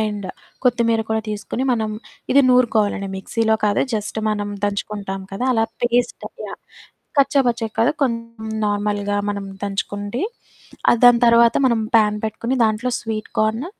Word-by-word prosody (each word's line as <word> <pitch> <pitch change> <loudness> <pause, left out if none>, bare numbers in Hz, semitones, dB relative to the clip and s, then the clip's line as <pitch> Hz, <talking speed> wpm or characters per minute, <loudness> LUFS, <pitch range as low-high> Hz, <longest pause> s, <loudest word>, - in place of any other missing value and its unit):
And 210 -2 -2 0.4
కొత్తిమీర 230 -2 +2
కూడా 220 0 0
తీసుకొని, 210 +4 -4
మనం 220 -2 -1 0.4
ఇది 280 +1 +6
నూరుకోవాలండి. 220 -5 +2
మిక్సీలో 220 +3 0
కాదు. 205 -1 +2
జస్ట్ 210 0 -3
మనం 205 -1 -2
దంచుకుంటాం 200 -1 -3
కదా! 195 +6 -3
అలా 225 -1 +3 0.2
పేస్ట్ 240 0 0 0.2
యాహ్! - - -9 0.6
కచ్చాపచ్చాగా 245 -5 +2
కాదు, 235 +6 +4
కొంచం 230 -3 -3
నార్మల్‌గా 205 0 -1
మనం 200 -1 -4 0.2
దంచుకుండి 205 +3 -3 0.7
ఆహ్, 240 - +3
దాని 245 -1 +7
తర్వాత 235 0 +6
మనం 235 -3 +2 0.2
ప్యాన్ 210 -1 +3
పెట్టుకొని, 230 +4 -2
దాంట్లో 220 +3 0
స్వీట్ 220 -2 -5
కార్న్, 220 +6 0
220 Hz, 135 wpm, -21 LUFS, 205-235 Hz, 0.7 s, దాని